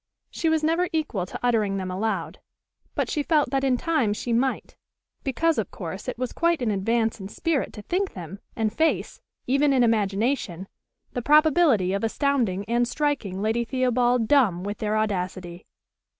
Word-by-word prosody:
She 330 - 0
was 320 -1 +1
never 330 +3 +1
equal 285 - -2
to - - -7
uttering 215 -5 +1
them 185 -1 -4
aloud; 215 +4 -2 0.6
but - - 0
she 300 - -1
felt 295 -3 +2
that 270 -1 0
in 260 -2 +2
time 300 -9 +1
she 235 +3 -3
might, 260 +3 -1 0.5
because 295 +3 +1
of 205 - -2
course 185 +1 -7
it - - -3
was 255 0 -3
quite 340 -1 +1
an 225 - +1
advance 225 +3 0
in 190 - -6
spirit 310 - -1
to 210 - -9
think 375 - -1
them, 180 +2 -8 0.2
and 220 -1 -1
face, 320 +5 0 0.2
even 275 +3 +3
in 260 -2 +4
imagination, 205 -3 0 0.5
the 245 - -2
probability 295 - +4
of 200 - -2
astounding 225 -5 0
and 240 +2 +1
striking 240 -10 -2
Lady 225 +2 +1
Theobald 245 -1 +1
dumb 215 -11 +3
with 205 +1 -4
their 215 0 0
audacity. 185 -4 -3
235 Hz, 170 wpm, -25 LUFS, 200-280 Hz, 0.6 s, in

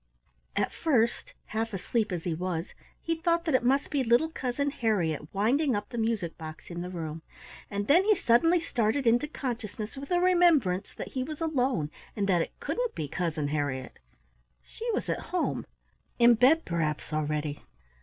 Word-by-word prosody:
At - - 0
first, 240 -8 +1
half 225 -1 -3
asleep 215 +3 -1
as 175 -3 -3
he 175 - -1
was, 170 0 -3 0.3
he 330 - 0
thought 335 +1 +1
that 320 - 0
it 260 - +4
must 270 +3 +1
be 285 -3 +1
little 240 +7 +3
Cousin 280 -1 -2
Harriett 175 - -1
winding 250 +7 +2
up 205 0 -3
the 240 - -6
music 220 -8 -1
box 155 +2 -9
in 170 0 -4
the 180 - -5
room, 165 -3 -5 0.5
and 205 0 -2
then 330 - +5
he 425 0 +5
suddenly 330 +5 +4
started 245 -4 0
into 240 +5 +3
consciousness 230 -6 -5
with 275 +1 -8
the 355 - +3
remembrance 345 - +3
that - - -6
he 260 - -3
was 300 +3 -5
alone 255 - 0 0.2
and 200 -2 0
that 180 -3 +3
it - - -5
couldn't - - -2
be 150 - -3
Cousin 155 -2 -2
Harriett. 145 -3 -3 0.6
She 470 +1 -6
was 435 - -2
at - - -1
home; 360 -1 -1 0.5
in 240 0 +7
bed 260 +8 +4
perhaps, 155 -3 -2
already. 150 -1 -1
230 Hz, 175 wpm, -29 LUFS, 175-285 Hz, 0.6 s, in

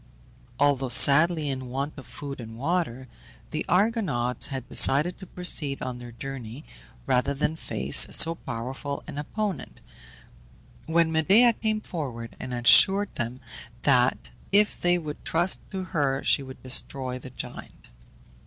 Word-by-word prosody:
Although 140 -2 +1
sadly 155 +5 +5
in 130 -2 -4
want 140 +4 -4
of 135 - -12
food 140 -3 -7
and 115 -1 -10
water, 135 -3 -2 0.4
the - - -3
Argonauts 180 - +1
had 130 -2 -6
decided 150 +7 +4
to 190 - -11
proceed 155 -7 +1
on 125 -1 -5
their 120 -1 -10
journey 130 +1 -8 0.4
rather 130 +3 0
than 150 +3 -1
face - - 0
so 165 - +3
powerful 135 +1 -6
an 150 -2 -7
opponent, 205 +6 -5 1.1
when 165 0 +2
Medea 200 +10 +4
came 215 -1 -2
forward 125 - -7
and 130 - -7
assured 190 +12 +5
them 120 +2 -5 0.4
that 125 -2 +2 0.2
if 210 +1 +2
they 175 0 +2
would 155 -3 -7
trust 175 +3 +2
to 190 -2 -5
her 140 -7 -1
she - - +3
would 130 -1 -11
destroy 130 0 -1
the 130 - -11
giant. 130 - -10
140 Hz, 140 wpm, -25 LUFS, 130-175 Hz, 1.1 s, sadly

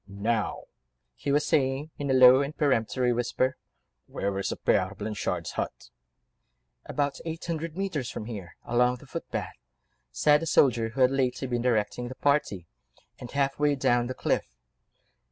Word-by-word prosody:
"Now," 105 +3 -2 0.5
he 140 - -3
was 145 +1 +2
saying 140 +1 0
in 145 -1 -3
a 130 - +3
low 130 +1 +8
and 140 +2 -4
peremptory 125 -3 +1
whisper, 125 +2 0 0.5
"where 100 0 -3
is 100 - -2
the - - -3
Père 95 +3 +1
Blanchard's 105 -1 -3
hut?" - - -5 1.0
"About 145 -1 -1
eight 165 0 -5
hundred 165 -1 -4
mètres 165 -10 -2
from 105 - -6
here, 100 -7 -8
along 125 +1 +2
the 125 - -14
footpath," 165 +5 -5 0.6
said 150 - +3
the 165 - -3
soldier 120 -7 +3
who 130 +4 -4
had 130 0 +5
lately 130 -1 0
been 120 -1 -1
directing 120 0 0
the 130 - -7
party, 140 - 0 0.5
"and 125 - -8
half 140 0 -1
way 145 -1 +3
down 120 -2 +2
the 130 - -5
cliff." - - -1
130 Hz, 160 wpm, -27 LUFS, 115-145 Hz, 1.0 s, low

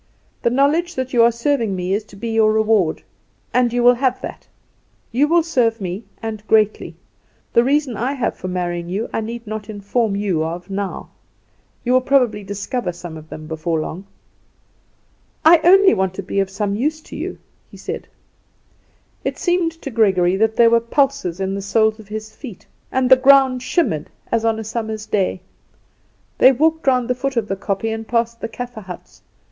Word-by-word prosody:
The - - +2
knowledge 300 +7 +1
that 260 0 -3
you 240 - +5
are 235 +1 +6
serving 235 -3 0
me 180 +1 -2
is 210 +2 0
to 205 - -16
be 230 +4 -5
your 220 -1 +3
reward; 215 -6 +2 0.5
and 250 -1 +3
you 245 0 0
will 245 +1 +7
have 255 0 0
that. - - -8 0.6
You 270 +6 +3
will 335 +1 +3
serve 240 -8 +1
me, 190 +3 -5 0.2
and 220 -2 -4
greatly. 215 -1 +2 0.6
The 235 - +5
reasons 275 -3 +1
I 255 +4 -1
have 265 -4 -2
for - - -7
marrying 175 -1 -3
you 205 +6 -3
I - - 0
need 230 +2 -6
not 215 0 -6
inform 205 +1 -1
you 195 -6 0
of 170 +4 -5
now; 195 -1 -4 0.7
you 250 - +1
will 255 - +5
probably 250 -6 +2
discover 205 +2 -3
some 175 -1 -9
of 155 0 -11
them 155 - -8
before 160 +1 -2
long." 180 +5 -6 1.4
"I 330 +1 +8
only 385 +2 +7
want 190 -1 -1
to 195 - -5
be 195 +2 -2
of 195 -1 0
some 200 +1 -2
use 300 +9 -1
to - - -11
you," - - -5 0.3
he - - -13
said. - - -6 1.2
It - - -2
seemed 350 -2 +1
to 275 - -5
Gregory 190 -5 +3
that 220 +2 +1
there 230 -1 +5
were 235 - +5
pulses 235 - 0
in 190 0 -1
the 200 - -3
soles 220 +2 +1
of 215 - -13
his 215 +1 -7
feet, 235 -10 -10 0.3
and 260 -1 +1
the - - +11
ground 265 -1 +5
shimmered 245 - 0 0.2
as 230 -1 +1
on 225 -1 +2
a 220 - -4
summer's 220 -1 -4
day. 190 -3 -1 1.0
They 260 - +8
walked 315 +4 +1
round 250 -2 +3
the 250 - +1
foot 265 +1 -3
of 220 -3 0
the 195 - -2
kopje 200 +3 -2
and 225 0 -6
past 235 0 -1
the - - -2
Kaffer 245 -1 -7
huts. 185 -3 -11
225 Hz, 190 wpm, -20 LUFS, 195-255 Hz, 1.4 s, the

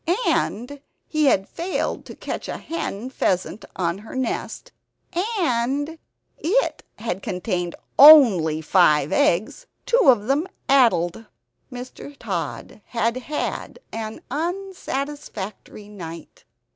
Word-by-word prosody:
And 270 +6 -1 0.2
he 310 -1 +1
had 195 -8 +3
failed 360 +2 -3
to - - -10
catch - - -5
a - - -3
hen 255 -7 -5
pheasant 190 -2 -1
on 175 0 -1
her 220 +5 -10
nest; 260 - -3 0.7
and 285 +1 0 0.4
it 425 +11 +1
had 195 -4 -3
contained 180 -2 -3 0.2
only 215 - +8
five 155 -4 +4
eggs, 215 - +1 0.2
two - - +3
of 220 -5 +4
them 285 +8 +1 0.2
addled. 225 -7 +3 0.4
Mr. 255 +3 -9
Tod 200 -1 -5
had 230 0 0
had 280 +4 -4 0.2
an 220 -1 -5
unsatisfactory 290 - -5
night. 170 -6 -10
235 Hz, 105 wpm, -23 LUFS, 190-290 Hz, 0.7 s, only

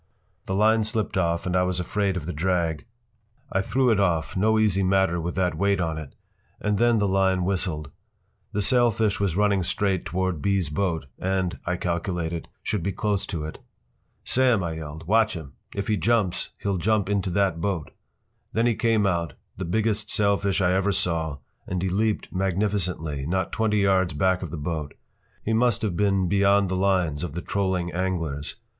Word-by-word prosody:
The 95 - -1
line 110 +2 +4
slipped 110 0 -1
off 85 -2 0
and 90 0 -1
I 90 - +4
was 90 0 0
afraid 95 +2 0
of 80 - -5
the 90 - -4
drag. 85 +1 -1 0.6
I 95 - +1
threw 125 +4 +2
it 105 - +2
off—no 95 +4 +2
easy 105 -3 +2
matter 95 -2 +2
with 85 +1 -3
that 90 -2 +1
weight 100 +3 +1
on 80 -3 -1
it—and 100 +7 -6
then 120 0 +4
the 105 -1 +2
line 95 -1 +2
whistled. 85 -6 -2 0.6
The 105 - 0
sailfish 115 -2 +2
was 100 -5 0
running 100 -1 +2
straight 95 +1 0
toward 90 -1 -2
B.’s 100 -5 +1
boat 80 -2 -1
and, 95 0 -1
I 90 - +1
calculated, 85 -1 -2
should 105 - -1
be 100 +4 -1
close 100 +1 -1
to 80 -5 -4
it. 80 - -7 0.6
“Sam,” 125 -6 +3
I 80 -2 -3
yelled, 80 +1 -7
“watch 110 +3 +3
him! 75 -4 -8 0.2
If 100 0 -3
he 105 - +1
jumps 110 -6 +1
he’ll 100 -2 -1
jump 105 +2 +1
into 100 -2 0
that 90 -2 +1
boat!” 90 -5 -2 0.6
Then 115 +1 +2
he 120 - +3
came 110 -2 +2
out, 85 -4 0 0.2
the 95 - -4
biggest 110 +3 0
sailfish 100 -1 +2
I 90 0 +3
ever 95 +2 +2
saw, 85 -6 0 0.3
and 90 - -2
he 95 - 0
leaped 105 +3 -1
magnificently, 90 -6 -1
not 95 +1 -1
twenty 110 -1 +1
yards 95 -4 +2
back 95 +4 +1
of 90 - -5
that 80 - -5
boat. 75 -3 -3 0.5
He 110 - 0
must 120 -1 +2
have 100 -5 -1
been 100 -1 +2
beyond 100 +1 +3
the 95 - -1
lines 90 -5 +1
of 85 - -4
the 85 - -4
trolling 95 -3 -1
anglers. 85 -6 -2
95 Hz, 180 wpm, -25 LUFS, 85-100 Hz, 0.6 s, line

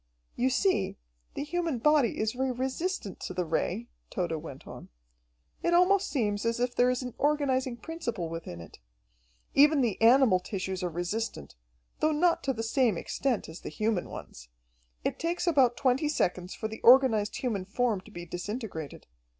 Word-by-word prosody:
"You 255 +2 +2
see, 265 - +1 0.4
the - - -2
human 330 -2 -1
body 285 -1 +3
is 215 0 0
very 260 +1 -1
resistant 260 - -3
to 185 - -6
the 180 - 0
Ray," 180 +7 -1 0.2
Tode 175 -3 -2
went 140 -4 -10
on. - - -10 0.7
"It 345 - +2
almost 380 +2 +4
seems 210 -6 -1
as 230 0 0
if 245 0 0
there 245 +1 +3
is 250 +1 -1
an 250 -2 -6
organizing 270 -4 +1
principle 235 - -4
within 160 - -7
it. 85 - -13 0.7
Even 290 +1 +6
the 225 -6 -1
animal 235 -4 +6
tissues 190 0 -4
are 180 - -1
resistant, 175 - -4 0.5
though 310 0 +2
not 335 +3 +2
to 270 - +2
the 225 -3 -3
same 225 -3 +2
extent 255 +6 -1
as 160 +2 -9
the - - -7
human 215 -4 -1
ones. - - -10 0.5
It - - -2
takes 340 +1 -1
about 270 -8 +3
twenty 270 +3 +2
seconds 180 - -1
for 220 - -3
the 220 0 -9
organized 240 -5 +5
human 210 -7 -2
form 215 0 0
to 205 - -16
be 175 -4 -8
disintegrated. 175 - -6
235 Hz, 170 wpm, -29 LUFS, 190-275 Hz, 0.7 s, Even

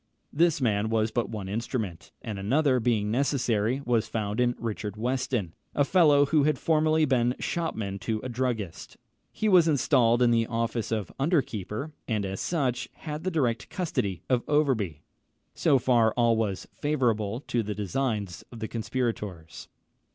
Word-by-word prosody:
This 165 0 +3
man 110 -4 +1
was 110 0 +1
but 120 - -1
one 105 -4 -5
instrument; 105 -4 -4
and 105 -3 -5
another 130 +6 +2
being 110 -3 +1
necessary, 125 -2 +1
was 115 -2 +1
found 105 0 -3
in 120 0 +2
Richard 105 -2 -4
Weston, 125 -6 -1 0.2
a 145 - +3
fellow 150 -4 +5
who 150 +1 +3
had 150 -2 +2
formerly 155 0 +2
been 125 -3 +2
shopman 110 - -3
to 110 +2 -2
a - - -3
druggist. 120 -7 -3 0.3
He 215 - -1
was 180 -5 +6
installed 125 -5 +3
in 120 - +4
the 115 -1 +2
office 115 -1 -2
of 105 -5 -2
under 150 +1 +3
keeper, 105 - -5 0.2
and 105 -4 -1
as 95 0 -4
such 130 -7 -1
had 150 0 -6
the 185 - 0
direct 125 - -1
custody 100 - -2
of 125 -2 +2
Overbury. 120 - +1 0.5
So 140 - +3
far 120 -3 +3
all 120 -1 +3
was 105 -4 -2
favourable 120 -6 0
to 120 -5 -1
the 105 -1 -4
designs 105 -2 -2
of 120 - -9
the 110 - -3
conspirators. 110 - -4
120 Hz, 160 wpm, -27 LUFS, 105-135 Hz, 0.5 s, was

